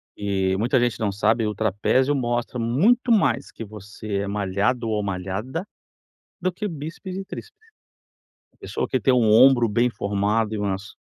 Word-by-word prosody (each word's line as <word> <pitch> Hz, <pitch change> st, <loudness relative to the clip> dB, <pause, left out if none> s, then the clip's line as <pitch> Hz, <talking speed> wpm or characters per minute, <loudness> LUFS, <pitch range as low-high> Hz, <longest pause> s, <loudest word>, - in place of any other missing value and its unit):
E 95 Hz, -2 st, 0 dB
muita 120 Hz, +5 st, +2 dB
gente 120 Hz, -1 st, 0 dB
não 105 Hz, -2 st, 0 dB
sabe, 110 Hz, +3 st, +1 dB
o 105 Hz, -, -3 dB
trapézio 110 Hz, +7 st, +1 dB
mostra 120 Hz, -1 st, -2 dB
muito 200 Hz, -, +2 dB
mais 135 Hz, -, +2 dB
que -, -, -8 dB
você 105 Hz, -1 st, -6 dB
é 100 Hz, -, -2 dB
malhado 105 Hz, +4 st, -1 dB
ou 105 Hz, -1 st, 0 dB
malhada 100 Hz, -, -3 dB, 0.8 s
do 185 Hz, -, +1 dB
que 210 Hz, +4 st, -4 dB
bíceps 165 Hz, +3 st, -7 dB
e 195 Hz, 0 st, -5 dB
tríceps. 430 Hz, -, -9 dB, 1.0 s
A -, -, -33 dB
pessoa -, -, -4 dB
que -, -, 0 dB
tem 130 Hz, -, +3 dB
um 120 Hz, -3 st, +3 dB
ombro 120 Hz, +1 st, +6 dB
bem 120 Hz, +4 st, +2 dB
formado 105 Hz, +1 st, -1 dB
e -, -, -2 dB
umas 100 Hz, 0 st, -3 dB
115 Hz, 170 wpm, -23 LUFS, 100-130 Hz, 1.0 s, ombro